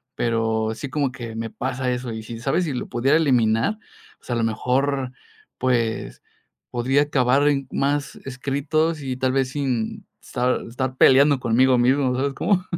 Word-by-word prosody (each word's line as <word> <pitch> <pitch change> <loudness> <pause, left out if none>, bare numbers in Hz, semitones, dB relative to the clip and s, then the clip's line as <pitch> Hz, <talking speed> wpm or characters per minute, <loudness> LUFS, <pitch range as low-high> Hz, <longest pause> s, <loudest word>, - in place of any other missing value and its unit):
pero 110 -1 0
sí 140 +4 -6
como 140 -1 -1
que 120 -3 -8
me 115 0 -4
pasa 130 0 -2
eso. 125 -1 -3
Y 110 0 -6
si 115 0 -8
sabes 135 +9 0
si 150 - -3
lo 125 - -4
pudiera 130 +5 +2
eliminar, 125 - +2 0.4
pues, - - -19
a - - +1
lo 115 - 0
mejor, 130 +4 0 0.5
pues, 120 -3 -1 0.5
podría 130 +4 +2
acabar 140 0 +2
en 140 -2 +1
más 140 -1 -1
escritos, 145 +4 -1
y 130 -2 -4
tal 130 0 +1
vez 135 -1 +1
sin 130 -5 -2 0.2
estar 125 +1 -1
estar 130 +2 -3
peleando 140 +1 +6
conmigo 125 +2 +3
mismo. 130 +1 +2
¿Sabes 135 +2 -1
cómo? 185 +4 +1
130 Hz, 165 wpm, -23 LUFS, 120-140 Hz, 0.5 s, peleando